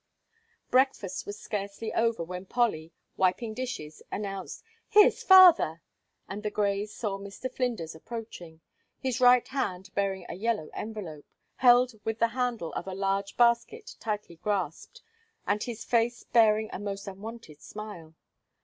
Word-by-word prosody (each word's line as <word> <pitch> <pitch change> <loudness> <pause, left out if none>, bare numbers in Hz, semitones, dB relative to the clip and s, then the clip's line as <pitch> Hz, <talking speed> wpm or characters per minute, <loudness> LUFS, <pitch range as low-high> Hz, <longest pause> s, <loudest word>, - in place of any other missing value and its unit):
Breakfast 255 -7 +1
was 205 - -6
scarcely 200 +2 -4
over, 230 -5 +1
when 180 +2 -7
Polly, 180 -10 0 0.3
wiping 205 +5 +1
dishes, 215 -11 -6
announced: 195 -2 -5 0.3
"Here's 420 0 +6
father!" 355 - +7 0.4
and 200 +2 -6
the 210 - -2
Greys 205 0 -1
saw 200 -4 -3
Mr. 200 +6 -7
Flinders 230 -11 -2
approaching, 175 -3 -9 0.4
his 260 -1 -2
right 250 0 +6
hand 190 -9 -3
bearing 195 -2 -1
a - - -6
yellow 210 -4 -2
envelope, 190 -9 -7 0.3
held 250 0 +6
with 225 0 -2
the 230 0 +2
handle 240 -8 -2
of 175 - -5
a 190 - -4
large 195 +1 -1
basket 240 - +2
tightly 210 -6 -4
grasped, 200 - -3 0.4
and 205 +1 0
his 235 -2 -5
face 235 0 +1
bearing 220 -2 +3
a - - -4
most 200 -1 -5
unwonted 195 -5 -9
smile. 190 -7 -9
210 Hz, 140 wpm, -28 LUFS, 190-235 Hz, 0.4 s, father